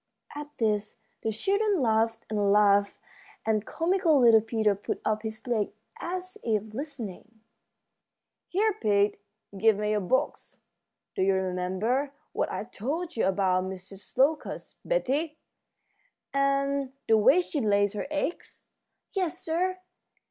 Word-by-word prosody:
At 295 Hz, 0 st, -6 dB
this 210 Hz, -2 st, 0 dB, 0.3 s
the 220 Hz, -, -1 dB
children 400 Hz, -, +1 dB
laughed 225 Hz, -2 st, +1 dB
and 205 Hz, -2 st, +1 dB
laughed, 200 Hz, -1 st, +4 dB, 0.5 s
and 220 Hz, -1 st, +1 dB
comical 335 Hz, -3 st, +2 dB
little 230 Hz, -3 st, +7 dB
Peter 220 Hz, -1 st, +1 dB
put 200 Hz, +1 st, -4 dB
up 215 Hz, 0 st, +1 dB
his 220 Hz, 0 st, -6 dB
leg 225 Hz, -5 st, 0 dB, 0.3 s
as 370 Hz, +1 st, -5 dB
if 215 Hz, -1 st, -1 dB
listening. 230 Hz, -, -7 dB, 1.1 s
"Here, 425 Hz, +4 st, +2 dB
Pete, 205 Hz, -1 st, +2 dB, 0.3 s
give 215 Hz, +1 st, +4 dB
me 210 Hz, 0 st, 0 dB
your 210 Hz, -, +2 dB
box. 205 Hz, +7 st, -1 dB, 0.6 s
Do -, -, -2 dB
you 190 Hz, 0 st, +3 dB
remember 190 Hz, +9 st, -1 dB, 0.2 s
what -, -, -1 dB
I -, -, -3 dB
told 315 Hz, -, -4 dB
you 225 Hz, -, +2 dB
about 185 Hz, -1 st, +2 dB
Mrs. 190 Hz, +2 st, -9 dB
Locust, 290 Hz, +4 st, 0 dB
Betty, 315 Hz, -, 0 dB, 1.0 s
and 275 Hz, -1 st, +1 dB
the 225 Hz, -, +6 dB
way 260 Hz, +11 st, +6 dB
she 320 Hz, -5 st, -2 dB
lays 205 Hz, -2 st, +2 dB
her 210 Hz, -, -4 dB
eggs?" 305 Hz, +2 st, -3 dB, 0.5 s
"Yes, 370 Hz, -5 st, -1 dB
sir. 365 Hz, +3 st, -1 dB
225 Hz, 130 wpm, -28 LUFS, 205-295 Hz, 1.1 s, little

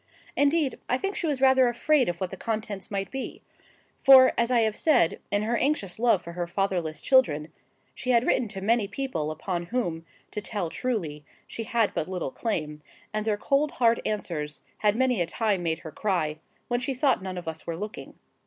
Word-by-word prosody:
Indeed, 285 Hz, 0 st, +2 dB
I 250 Hz, -, +2 dB
think 390 Hz, +8 st, -3 dB
she 335 Hz, -, -2 dB
was 280 Hz, -4 st, -1 dB
rather 265 Hz, -1 st, +6 dB
afraid 255 Hz, +2 st, +2 dB
of 175 Hz, 0 st, -4 dB
what 185 Hz, -2 st, -3 dB
the -, -, -5 dB
contents 215 Hz, -2 st, -4 dB
might 195 Hz, -2 st, -3 dB
be; 265 Hz, 0 st, -6 dB, 0.6 s
for, 265 Hz, -1 st, +8 dB
as 235 Hz, 0 st, +1 dB
I 245 Hz, -2 st, +4 dB
have 220 Hz, -1 st, +1 dB
said, 250 Hz, -, +3 dB
in 205 Hz, +1 st, +1 dB
her 230 Hz, +2 st, 0 dB
anxious 235 Hz, -8 st, 0 dB
love 230 Hz, -6 st, +3 dB
for 170 Hz, -, -7 dB
her 175 Hz, 0 st, -3 dB
fatherless 175 Hz, -4 st, -1 dB
children, 160 Hz, -, +3 dB, 0.4 s
she 255 Hz, -, -6 dB
had 240 Hz, 0 st, +4 dB
written 240 Hz, -, +2 dB
to 195 Hz, -2 st, -7 dB
many 220 Hz, +1 st, +2 dB
people 200 Hz, -, -3 dB
upon 170 Hz, +2 st, -4 dB
whom, 175 Hz, -9 st, -2 dB, 0.3 s
to 210 Hz, -, -4 dB
tell 200 Hz, -6 st, -3 dB
truly, 170 Hz, -, -3 dB, 0.2 s
she 225 Hz, -, -6 dB
had 225 Hz, -1 st, +1 dB
but 155 Hz, -, -2 dB
little 180 Hz, -7 st, -3 dB
claim; 150 Hz, -, -3 dB, 0.3 s
and 215 Hz, +1 st, -2 dB
their 210 Hz, -1 st, +1 dB
cold, 280 Hz, +6 st, +1 dB
hard 235 Hz, -2 st, +3 dB
answers 160 Hz, -8 st, -3 dB, 0.2 s
had 210 Hz, -1 st, +3 dB
many 250 Hz, -4 st, +2 dB
a 170 Hz, -, +1 dB
time 205 Hz, +1 st, 0 dB
made 165 Hz, -2 st, 0 dB
her 160 Hz, -, -6 dB
cry, 160 Hz, -6 st, -1 dB, 0.3 s
when 240 Hz, 0 st, 0 dB
she 260 Hz, +2 st, -2 dB
thought 260 Hz, -3 st, +2 dB
none 185 Hz, -1 st, -5 dB
of 175 Hz, -, -7 dB
us 160 Hz, 0 st, -6 dB
were 165 Hz, -1 st, -3 dB
looking. 210 Hz, +3 st, -7 dB
210 Hz, 200 wpm, -27 LUFS, 175-250 Hz, 0.6 s, for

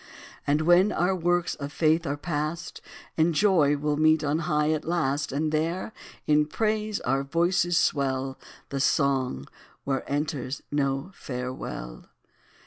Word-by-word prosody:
And 145 Hz, +2 st, +2 dB
when 175 Hz, +5 st, +5 dB
our 180 Hz, +1 st, +1 dB
works 175 Hz, 0 st, +1 dB
of 140 Hz, -1 st, -6 dB
faith 160 Hz, +2 st, +2 dB
are 145 Hz, -, -2 dB
past, 155 Hz, +2 st, -4 dB, 0.4 s
In 165 Hz, +1 st, +3 dB
joy 160 Hz, -5 st, +4 dB
we 150 Hz, +1 st, -4 dB
'll 145 Hz, -1 st, +1 dB
meet 155 Hz, 0 st, +4 dB
on 150 Hz, +2 st, 0 dB
high 150 Hz, 0 st, +2 dB
at 155 Hz, -1 st, -1 dB
last; 145 Hz, -4 st, -1 dB
And 150 Hz, +3 st, -1 dB
there, 165 Hz, +7 st, -1 dB, 0.3 s
in 150 Hz, 0 st, +3 dB
praise, 215 Hz, +3 st, -1 dB
our 135 Hz, +2 st, +1 dB
voices 175 Hz, +4 st, +1 dB
swell 135 Hz, -4 st, 0 dB, 0.3 s
The 140 Hz, -, -3 dB
song, 135 Hz, -, +1 dB, 0.4 s
where 135 Hz, -1 st, -1 dB
enters 145 Hz, -2 st, -2 dB
no 140 Hz, +3 st, -1 dB
farewell. 125 Hz, -, -6 dB
150 Hz, 140 wpm, -26 LUFS, 140-170 Hz, 0.4 s, when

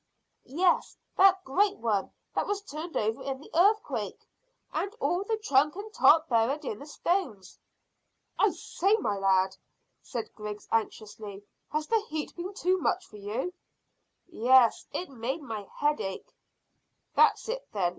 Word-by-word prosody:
"Yes, 350 Hz, +6 st, +1 dB, 0.2 s
that 380 Hz, 0 st, +5 dB
great 400 Hz, +9 st, +2 dB
one 210 Hz, -4 st, 0 dB, 0.2 s
that -, -, 0 dB
was 410 Hz, 0 st, -2 dB
turned 325 Hz, -1 st, -5 dB
over 220 Hz, +1 st, 0 dB
in 270 Hz, -1 st, -4 dB
the 295 Hz, -, -14 dB
earthquake, 405 Hz, +6 st, +1 dB, 0.5 s
and 395 Hz, -, -1 dB
all 350 Hz, +2 st, +1 dB
of 400 Hz, -, -7 dB
the 445 Hz, -, +1 dB
trunk 300 Hz, -7 st, +2 dB
and 420 Hz, +2 st, -8 dB
top 320 Hz, -5 st, +6 dB
buried 260 Hz, +5 st, +1 dB
in 215 Hz, -4 st, -4 dB
the 285 Hz, -, -10 dB
stones." 300 Hz, -, -2 dB, 0.8 s
"I -, -, +5 dB
say, 395 Hz, +4 st, +1 dB
my 210 Hz, -, -1 dB
lad," 190 Hz, -1 st, +3 dB, 0.5 s
said 235 Hz, -2 st, -5 dB
Griggs 210 Hz, -1 st, -7 dB
anxiously, 210 Hz, -2 st, -3 dB, 0.3 s
"has 305 Hz, 0 st, -1 dB
the 450 Hz, +4 st, +1 dB
heat 305 Hz, 0 st, -4 dB
been 365 Hz, +3 st, -6 dB
too 370 Hz, -1 st, +1 dB
much 360 Hz, +2 st, 0 dB
for 210 Hz, -, -13 dB
you?" 220 Hz, -, -3 dB, 0.7 s
"Yes, 255 Hz, -6 st, +4 dB
it 360 Hz, -, -4 dB
made 265 Hz, +5 st, -4 dB
my 215 Hz, -6 st, -6 dB
head 295 Hz, +1 st, 0 dB
ache." 195 Hz, 0 st, -6 dB, 0.8 s
"That's -, -, +4 dB
it, -, -, -4 dB
then. 190 Hz, -5 st, +1 dB
295 Hz, 155 wpm, -29 LUFS, -, 0.8 s, top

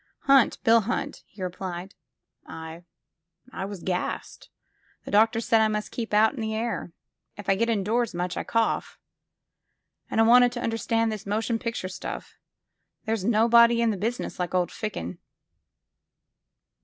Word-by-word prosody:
Hunt— 275 Hz, -3 st, +4 dB
Bill 230 Hz, 0 st, +5 dB
Hunt," 250 Hz, +6 st, -3 dB
he 195 Hz, -2 st, -9 dB
replied. 185 Hz, +1 st, -5 dB, 0.5 s
''I— 160 Hz, +1 st, -9 dB, 0.7 s
I 190 Hz, -, -4 dB
was 200 Hz, -3 st, -8 dB
gassed. 180 Hz, -1 st, -4 dB, 0.6 s
The -, -, -7 dB
doctors 225 Hz, +2 st, +3 dB
said 225 Hz, -1 st, +4 dB
I 220 Hz, -, +4 dB
must 210 Hz, 0 st, -3 dB
keep 230 Hz, -2 st, -5 dB
out 215 Hz, +3 st, +4 dB
in 255 Hz, -, -6 dB
the 220 Hz, 0 st, -2 dB
air. 220 Hz, -6 st, -3 dB, 0.5 s
If 205 Hz, -, -9 dB
I 195 Hz, -, +4 dB
get 230 Hz, +4 st, 0 dB
indoors 225 Hz, 0 st, 0 dB
much, 180 Hz, 0 st, -2 dB
I -, -, -3 dB
cough. 230 Hz, -1 st, -1 dB, 1.1 s
And -, -, -1 dB
I -, -, +7 dB
wanted 245 Hz, +1 st, +6 dB
to 240 Hz, -, -4 dB
under 225 Hz, 0 st, -1 dB
stand 225 Hz, +1 st, +1 dB
this 210 Hz, -2 st, -6 dB
motion 225 Hz, +3 st, -1 dB
picture 230 Hz, -6 st, -3 dB
stuff 185 Hz, -, -7 dB, 0.4 s
— -, -, -45 dB
^there's 220 Hz, -3 st, -1 dB
nobody 235 Hz, +2 st, +5 dB
in 230 Hz, -1 st, +3 dB
the -, -, -2 dB
business 225 Hz, +3 st, -3 dB
like 180 Hz, 0 st, -2 dB
old 180 Hz, -1 st, +1 dB
Ficken." 90 Hz, -, -5 dB
220 Hz, 160 wpm, -26 LUFS, 190-230 Hz, 1.1 s, I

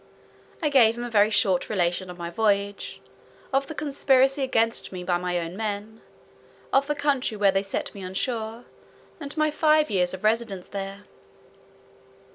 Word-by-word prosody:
I 300 Hz, -, +3 dB
gave 235 Hz, -5 st, +5 dB
him 240 Hz, -, -4 dB
a 240 Hz, -, -5 dB
very 210 Hz, -1 st, +5 dB
short 195 Hz, -4 st, +1 dB
relation 180 Hz, -2 st, 0 dB
of 180 Hz, -, -8 dB
my 170 Hz, -1 st, -5 dB
voyage; 200 Hz, 0 st, -1 dB, 0.5 s
of 270 Hz, 0 st, +2 dB
the 315 Hz, -, -7 dB
conspiracy 275 Hz, -2 st, +2 dB
against 230 Hz, -3 st, +1 dB
me 180 Hz, -1 st, -6 dB
by 175 Hz, -1 st, 0 dB
my 180 Hz, 0 st, -1 dB
own 170 Hz, +1 st, -4 dB
men; 215 Hz, +1 st, -4 dB, 0.7 s
of 275 Hz, +1 st, +4 dB
the 295 Hz, -, 0 dB
country 275 Hz, -6 st, 0 dB
where 200 Hz, -1 st, +4 dB
they 195 Hz, 0 st, +1 dB
set 195 Hz, -1 st, -4 dB
me 200 Hz, -, -9 dB
on 185 Hz, +1 st, -7 dB
shore, 225 Hz, 0 st, -3 dB, 0.5 s
and 285 Hz, -3 st, -7 dB
of -, -, -9 dB
my 310 Hz, 0 st, +2 dB
five 305 Hz, -3 st, +3 dB
years 180 Hz, -1 st, +1 dB
residence 215 Hz, -2 st, -1 dB
there. 195 Hz, 0 st, -6 dB
215 Hz, 170 wpm, -25 LUFS, 190-265 Hz, 0.7 s, gave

